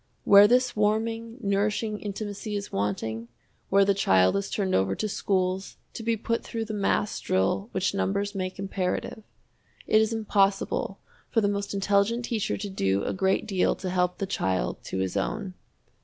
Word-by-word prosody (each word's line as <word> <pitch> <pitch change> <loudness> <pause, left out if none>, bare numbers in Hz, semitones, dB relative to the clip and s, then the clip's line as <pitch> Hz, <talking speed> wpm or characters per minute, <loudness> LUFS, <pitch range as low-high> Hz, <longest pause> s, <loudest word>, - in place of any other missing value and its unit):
Where 200 0 +8
this 250 +2 +2
warming, 225 +2 0
nourishing 210 +1 0
intimacy 205 +1 -5
is 200 0 -4
wanting, 110 +3 -2 0.4
where 195 0 +5
the 200 - +3
child 95 - +3
is 200 0 -1
turned 195 -3 -1
over 95 +1 +2
to 215 - -2
schools 190 -1 -1 0.2
to - - -6
be 225 0 0
put 230 +2 -2
through 225 -1 -4
the 215 - -5
mass 205 0 0
drill 95 - 0
which 190 +1 0
numbers 200 +1 -1
make 185 -2 -4
imperative 195 +1 -3 0.6
it 215 - +4
is 220 +1 +1
impossible 200 -3 +1 0.3
for 230 - +2
the 205 - +2
most 200 0 -2
intelligent 200 +4 +1
teacher 225 -4 -1
to 205 0 -5
do 95 - 0
a - - -2
great 190 +3 +1
deal 195 -4 +1
to 185 - -4
help 180 -1 +1
the 195 - -2
child 95 - -1
to - - -4
his 95 0 -2
own. 185 - -2
200 Hz, 170 wpm, -27 LUFS, 185-215 Hz, 0.6 s, Where